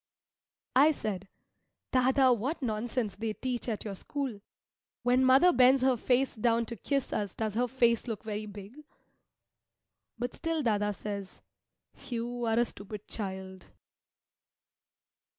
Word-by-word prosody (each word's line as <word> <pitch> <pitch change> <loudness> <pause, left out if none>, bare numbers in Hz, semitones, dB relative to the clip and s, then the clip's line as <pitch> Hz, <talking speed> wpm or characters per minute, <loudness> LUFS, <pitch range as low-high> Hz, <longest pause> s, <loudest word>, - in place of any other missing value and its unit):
I 295 +4 +6
said, 200 -7 -4 0.7
"Dâdâ, 260 0 +5
what 270 +7 -3
nonsense 220 -2 -2
they 220 0 -2
teach 250 +1 -3
at 220 -1 -3
your 205 - -3
school! 255 +1 -4 0.6
When 250 +2 +4
mother 265 +8 +6
bends 255 +1 +5
her 260 -1 +4
face 255 +3 +1
down 230 +1 +1
to 235 - -6
kiss 275 +4 -2
us 205 -3 -2
does 220 -2 -2
her 245 +3 +1
face 235 -2 +2
look 225 -2 -4
very 215 -1 -4
big?" 205 +8 -10 1.3
But 245 +1 -3
still 330 -2 -2
dâdâ 210 -3 +1
says, 200 -2 -6 0.7
"You 240 0 -3
are 225 0 +2
a 240 - +4
stupid 210 -1 -8
child." 190 -2 -6
235 Hz, 135 wpm, -30 LUFS, 210-255 Hz, 1.3 s, I